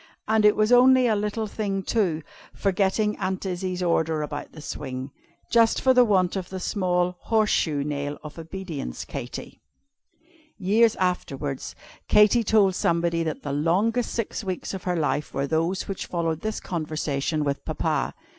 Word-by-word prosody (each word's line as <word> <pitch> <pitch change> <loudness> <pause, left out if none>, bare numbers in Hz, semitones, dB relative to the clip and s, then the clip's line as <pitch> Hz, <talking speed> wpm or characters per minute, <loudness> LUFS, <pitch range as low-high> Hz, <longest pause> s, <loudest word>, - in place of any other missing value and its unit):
"And 220 -1 +3
it 210 - +6
was 215 +2 +2
only 255 +1 +6
a 225 -3 +3
little 210 +2 -1
thing, 200 -2 -3
too, 180 -10 0 0.3
forgetting 200 +2 +1
Aunt 185 +1 -2
Izzie's 185 0 -2
order 160 -2 +1
about 145 0 -6
the - - -12
swing. 130 -3 -6 0.4
Just 230 -1 +4
for 260 - +4
the 250 -1 +6
want 190 -5 +2
of 185 -2 -4
the 190 - -5
small 180 -2 0
'horseshoe 200 -10 +1
nail' 145 0 -3
of 150 +2 -9
Obedience, 165 - -6
Katy." - - -7 1.0
Years 215 +4 +3
afterwards, 145 -7 -2 0.3
Katy 210 +3 +5
told 205 -3 +4
somebody 170 -1 +1
that 160 -2 -3
the 140 - -3
longest 195 - +1
six 230 -1 -3
weeks 185 -1 -4
of 190 - -6
her 180 -1 0
life 150 -2 -1
were 135 - 0
those 165 +5 -1
which 195 - -4
followed 165 -2 -2
this 215 0 -3
conversation 155 -2 -2
with 140 -1 -2
Papa. - - -1
180 Hz, 155 wpm, -25 LUFS, 155-210 Hz, 1.0 s, it